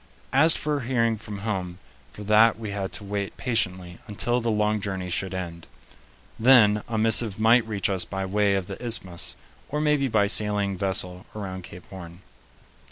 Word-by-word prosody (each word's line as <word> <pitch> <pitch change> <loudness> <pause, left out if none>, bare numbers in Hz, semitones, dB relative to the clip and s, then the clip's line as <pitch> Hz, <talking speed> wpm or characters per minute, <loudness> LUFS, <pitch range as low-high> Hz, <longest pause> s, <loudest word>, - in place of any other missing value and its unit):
As 160 +5 +6
for 150 -1 -1
hearing 115 -3 0
from 105 -2 -7
home, 90 -5 -3 0.3
for 105 - -9
that 110 +2 +4
we 110 -2 -6
had 100 -1 -4
to - - -6
wait 100 0 -4
patiently 90 -8 -2
until 120 +4 -1
the 115 - -1
long 105 -1 +1
journey 95 -3 -4
should 95 +1 -2
end; 85 -2 -6 0.7
then 110 -4 +6
a 115 - -3
missive 110 -1 +4
might 115 +1 +4
reach 105 -3 -1
us 95 -3 -1
by 95 0 -4
way 100 +1 +1
of 95 -2 -2
the 120 - -8
Isthmus, 95 -7 -4 0.3
or 150 - -2
maybe 150 -2 +2
by 110 -4 +2
sailing 105 -1 0
vessel 90 -1 -3
around 95 -3 -6
Cape 90 - -12
Horn. 90 -2 -10
105 Hz, 170 wpm, -25 LUFS, 95-115 Hz, 0.7 s, As